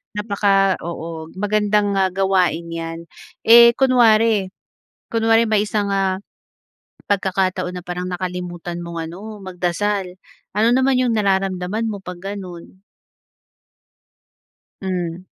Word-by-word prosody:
Napaka, 200 -2 +2
oo, 165 -1 -6
magandang, 210 0 +1
ah, 190 - +3
gawain 180 -3 +1
'yan. 165 0 -5 0.4
Eh, 235 +1 +8
kunwari 225 -6 +4 0.6
kunwari 225 0 +2
may 215 -1 +2
isang, 205 -2 0
ah, 190 -1 0 0.9
pagkakataon 185 -2 -1
na 180 - -7
parang 180 0 -4
nakalimutan 175 -1 -5
mong 170 -1 -5
ano, 205 +6 -8
magdasal, 185 +1 -2 0.4
ano 220 +2 +4
naman 260 +1 +3
yung 250 -2 +2
nararamdaman 195 0 0
mo 200 - -7
'pag 180 -1 -8
ganun? 190 -2 -8 2.0
Hmm. 180 -2 -3
190 Hz, 105 wpm, -20 LUFS, 180-210 Hz, 2.0 s, Eh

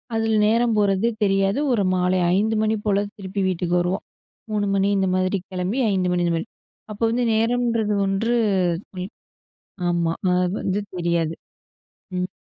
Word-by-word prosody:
அதுல 225 0 +1
நேரம் 230 +1 +2
போறதே 205 +2 +2
தெரியாது. 195 +4 +2
ஒரு 205 -4 +2
மாலை 180 +1 +1 0.2
5 220 +3 +1
மணி 220 0 +1
போல 200 -1 +2 0.2
திருப்பி 195 0 -4
வீட்டுக்கு 180 +1 0 0.6
வருவோம்.3 205 -1 0
மணி 195 0 +2
இந்த 190 - +1
மாதிரி 185 +1 +1
கிளம்பி 185 +7 -2
5 185 -2 +1
மணி 175 0 +1
இந்த 170 - +1
மாதிரி. 220 - -5 0.4
அப்போ 210 +2 -5
வந்து 245 +2 0
நேரம்ன்றது 230 -1 +1
ஒன்று 220 +5 0 1.5
ஆமா, 170 -1 +1 0.2
அது 180 0 +1
வந்து 195 +2 0 0.2
தெரியாது. 170 -2 0 0.8
ம். 180 0 -1
195 Hz, 140 wpm, -22 LUFS, 180-220 Hz, 1.5 s, நேரம்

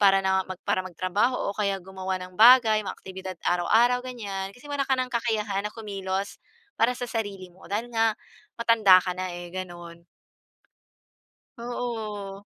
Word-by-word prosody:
para 195 -1 +6
na 190 0 +2 0.2
para - - +2
magtrabaho, 185 +6 0
o - - -22
kaya 200 -2 0
gumawa 190 0 -4
ng 185 0 -10
bagay 230 -2 +8
mga - - -4
aktibidad 190 -1 -8
araw-araw 225 +8 +3
ganyan. 200 -6 -5
Kasi 245 - -18
wala 285 -1 0
ka 265 - +3
ng 255 0 -1
kakayahan 215 -4 0
na - - -4
kumilos 195 -3 -4 0.4
para 230 +2 +4
sa 245 - -3
sarili 205 -5 -4
mo 185 - -16
dahil 225 +4 -2
nga 225 -1 +2 0.4
matanda 225 -5 +6
ka 180 - -2
na 185 0 -3
eh, 175 0 -8
gano'n. 175 -2 -8 1.5
Oo. 220 -5 -5
200 Hz, 155 wpm, -26 LUFS, 190-230 Hz, 1.5 s, bagay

